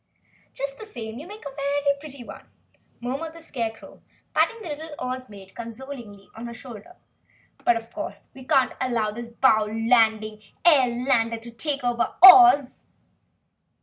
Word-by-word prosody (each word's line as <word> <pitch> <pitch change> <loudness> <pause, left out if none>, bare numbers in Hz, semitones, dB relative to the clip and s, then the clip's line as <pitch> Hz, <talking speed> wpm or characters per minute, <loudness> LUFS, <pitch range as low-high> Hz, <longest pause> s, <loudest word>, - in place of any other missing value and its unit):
"Just 275 0 -5
the 440 - -8
same 225 - -7
you 310 - -10
make 420 -3 -11
a 275 -1 -8
very 280 0 0
pretty 280 -4 -10
one," - - -12 0.5
murmured 275 +7 -4
the - - -11
Scarecrow, 230 -7 -6 0.3
patting 460 - +1
the 345 - -7
little 305 +1 -7
Oz 255 -1 -5
Maid 195 -2 -13
consolingly 230 -3 -9
on 225 +2 -9
the 235 0 -7
shoulder. 235 - -11 0.7
"But 235 - +3
of 230 0 -10
course, 310 - -7
we 260 - -12
cannot 260 -1 +2
allow 235 -4 0
this 235 +2 -7
bounding 220 -2 +2 0.2
airlander 245 -6 +3
to 235 +1 -10
take 280 +4 -3
Oz!" 290 +4 +6
250 Hz, 145 wpm, -24 LUFS, 225-280 Hz, 0.7 s, Oz